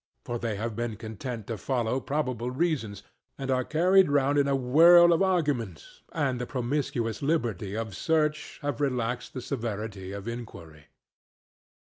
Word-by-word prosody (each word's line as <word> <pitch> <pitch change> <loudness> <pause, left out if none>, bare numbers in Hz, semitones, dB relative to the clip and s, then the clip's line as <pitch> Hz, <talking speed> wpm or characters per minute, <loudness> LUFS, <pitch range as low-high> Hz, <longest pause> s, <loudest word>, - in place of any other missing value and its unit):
For 120 0 -3
they 115 -3 -2
have 110 +2 -4
been 120 -2 -3
content 110 +1 -6
to 115 -2 -5
follow 125 +1 -1
probable 130 -5 -2
reasons, 130 - -2 0.3
and 135 -1 -3
are 130 0 +2
carried 180 +5 +4
round 145 0 +2
in 140 - +2
a 140 - +2
whirl 170 +7 +7
of 165 - +1
arguments, 145 - -1
and 150 -3 0
in 125 - -2
the 125 - -4
promiscuous 125 -3 -2
liberty 115 - -1
of 110 -4 -4
search 155 +1 0
have 145 -2 -2
relaxed 125 -3 -2
the 130 - -4
severity 110 -7 -4
of 100 +2 -7
inquiry. 85 -11 -8
125 Hz, 155 wpm, -27 LUFS, 110-145 Hz, 0.3 s, whirl